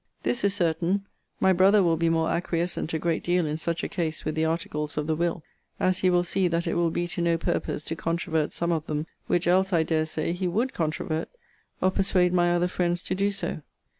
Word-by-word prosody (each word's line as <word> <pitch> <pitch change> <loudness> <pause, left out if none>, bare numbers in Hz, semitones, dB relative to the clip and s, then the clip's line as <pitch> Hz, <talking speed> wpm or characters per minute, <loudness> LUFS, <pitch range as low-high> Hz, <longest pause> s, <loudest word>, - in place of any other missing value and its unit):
This 240 - 0
is 200 -1 +2
certain: 175 +2 0 0.3
my 190 - +4
brother 195 +3 +5
will 165 -2 +3
be 165 +1 +1
more 165 0 +1
acquiescent 170 0 -1
a 160 - 0
great 165 +1 -1
deal 175 -1 +2
in 150 0 -2
such 170 +1 -2
a - - 0
case 160 -4 -3
with 155 - -1
the 160 +1 +1
articles 150 -2 -2
of 150 - 0
the 160 0 0
will, 170 0 -1 0.4
as 185 0 +2
he 185 - +3
will 175 -1 +3
see 185 +1 +1
that 170 0 0
it - - -1
will 170 -1 +2
be 175 +1 -2
to 175 - -3
no 170 -1 +2
purpose 155 - -2
to 165 - -4
controvert 165 -2 -1
some 170 0 -1
of 160 -2 -1
them, 150 0 -2 0.2
which 175 0 +1
else, 190 +2 +3
I 165 -3 +3
dare 155 -1 0
say, 155 +1 -2
he 180 +1 -2
would 225 +9 0
controvert, 155 0 -2 0.5
or 185 - +3
persuade 185 -2 +2
my 175 -1 +3
other 175 0 +2
friends 175 -1 -1
to - - -2
do 200 +2 +1
so. 200 -5 -3
170 Hz, 230 wpm, -26 LUFS, 160-180 Hz, 0.5 s, brother